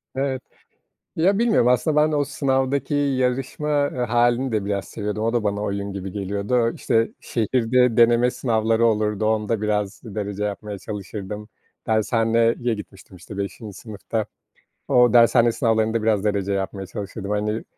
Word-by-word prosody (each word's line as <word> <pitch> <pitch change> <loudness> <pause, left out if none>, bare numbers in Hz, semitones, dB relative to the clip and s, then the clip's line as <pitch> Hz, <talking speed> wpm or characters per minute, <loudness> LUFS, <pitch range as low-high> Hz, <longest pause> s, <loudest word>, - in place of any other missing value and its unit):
Evet. 135 -1 -1 0.7
Ya, 190 +5 +2
bilmiyorum. 230 - +3
Aslında 125 +5 +2
ben 155 - -3
o 145 -1 +2
sınavdaki 140 0 0
yarışma 135 +1 0 0.4
hâlini 120 +2 +2
de 105 -3 -1
biraz 100 -1 -2
seviyordum. 105 0 -4
O 115 +1 0
da 120 -3 +1
bana 100 0 -1
oyun 100 -1 -3
gibi 95 -1 -5
geliyordu. 100 +4 0
İşte, 115 0 +1
şehirde 120 +1 +1
deneme 120 +1 +5
sınavları 115 -1 +1
olurdu. 105 -1 +1
Onda 110 0 0
biraz 105 -1 -1
derece 105 -2 -4
yapmaya 105 0 -4
çalışırdım. 105 +1 -7 0.4
Dershaneye 115 +1 +2 0.2
gitmiştim, 100 -3 -10
işte, 95 +3 -10
5'inci 100 +1 -5
sınıfta. 110 0 -4 0.6
O 125 -3 +4
dershane 120 0 +5
sınavlarında 110 -2 +1
biraz 110 -3 +2
derece 100 -2 0
yapmaya 95 0 -3
çalışırdım. 100 +1 -6
Hani, 105 +2 -1
110 Hz, 140 wpm, -22 LUFS, 105-125 Hz, 0.7 s, deneme